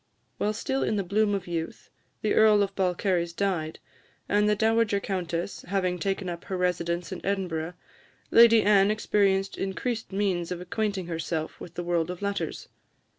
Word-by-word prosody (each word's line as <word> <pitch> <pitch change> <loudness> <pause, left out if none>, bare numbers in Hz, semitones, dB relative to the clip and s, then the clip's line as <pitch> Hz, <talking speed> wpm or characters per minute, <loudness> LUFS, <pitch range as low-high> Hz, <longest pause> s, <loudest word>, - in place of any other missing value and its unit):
While 210 - +1
still 265 +5 -2
in - - 0
the 200 - 0
bloom 205 +2 +1
of 190 -2 -4
youth, 165 -2 -5 0.3
the 215 - +2
Earl 215 -2 +5
of 200 0 -3
Balcarres 180 -2 0
died, 170 -5 -1 0.5
and 210 +1 +3
the 210 - +3
Dowager 220 -1 +2
Countess 180 -2 -3
having 185 -2 0
taken 195 +2 -2
up 175 0 -6
her 190 - -3
residence 175 -1 -1
in 185 - -6
Edinburgh, 180 -4 -2 0.6
Lady 230 -1 +7
Anne 200 -1 +5
experienced 200 -2 +1
increased 220 +4 -3
means 190 -3 -1
of 180 - -3
acquainting 195 +1 -2
herself 165 -1 -4
with 175 -1 -10
the 175 - -3
world 170 -1 0
of 180 +2 -6
letters. 200 0 -3
190 Hz, 165 wpm, -27 LUFS, 175-205 Hz, 0.6 s, Lady